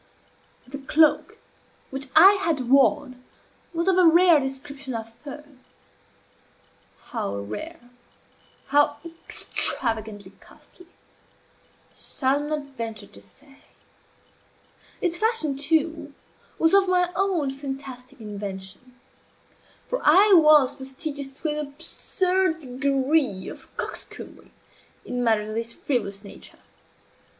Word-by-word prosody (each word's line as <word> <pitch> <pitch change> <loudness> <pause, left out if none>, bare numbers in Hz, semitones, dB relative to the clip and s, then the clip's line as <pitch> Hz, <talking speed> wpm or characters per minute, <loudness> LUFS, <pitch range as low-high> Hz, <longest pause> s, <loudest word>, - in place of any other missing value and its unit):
The 275 +2 -8
cloak 300 +2 +2 0.5
which 270 +1 -6
I 365 +5 +10
had 275 -8 -1
worn 255 -1 +3 0.5
was 335 +1 -2
of 375 -1 +4
a 360 - +6
rare 340 -1 +6
description 270 -1 -6
of 225 0 -6
fur; 290 +3 -10 1.7
how 100 - -3
rare, 245 - -7 0.8
how 290 +1 +3
extravagantly 220 - -2
costly, 360 - -19
I - - -35
shall 270 +1 0
not 295 -2 -5
venture 225 -3 -6
to 100 - -16
say. 270 - -17 1.4
Its 345 -1 +1
fashion, 440 - 0
too, 300 0 -1 0.4
was 325 +2 +3
of 395 -1 +5
my 360 -1 +2
own 360 -8 0
fantastic 270 -1 -8
invention; 205 +3 -8 0.9
for - - -2
I 405 +1 +6
was 305 -6 +6
fastidious 275 +2 -5
to 270 +4 -5
an 300 0 -2
absurd 360 +4 0
degree 270 -5 0
of - - -11
coxcombry, - - -6 0.6
in 245 0 -3
matters 215 -2 +1
of - - -5
this 230 +1 -4
frivolous 205 -7 -2
nature. 200 - -12
275 Hz, 105 wpm, -24 LUFS, 245-320 Hz, 1.7 s, I